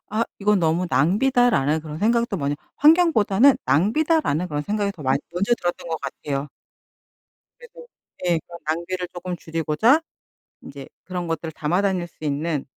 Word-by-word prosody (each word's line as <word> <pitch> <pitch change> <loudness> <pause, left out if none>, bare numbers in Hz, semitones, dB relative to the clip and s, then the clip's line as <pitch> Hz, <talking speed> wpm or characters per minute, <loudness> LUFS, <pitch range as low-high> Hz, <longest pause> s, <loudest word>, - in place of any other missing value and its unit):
'아 220 +2 0
이건 210 0 +2
너무 170 +1 +1
낭비다' 245 - +3
라는 150 - +1
그런 155 -1 -8
생각도 230 +1 +1
먼저 145 -2 -2 0.2
환경보다는 280 - +5
낭비다 300 - +2
라는 175 - -1
그런 150 -2 -3
생각이 205 +2 -1
많 130 0 +2 0.2
먼저 200 +7 +1
들었던 175 -5 -4
것 160 -1 -3
같아요. 140 +1 -4 1.1
그래도 485 0 -14 0.4
네, 175 -2 +2
그런 170 0 -10
낭비를 175 +3 -3
조금 180 0 -5
줄이고자 165 - +2 0.6
인제 140 -1 -10 0.2
그런 180 -2 -4
것들을 165 -1 -4
담아 160 +5 0
다닐 185 -3 0
수 160 - -14
있는 150 0 -2
175 Hz, 335 characters per minute, -23 LUFS, 155-215 Hz, 1.1 s, 환경보다는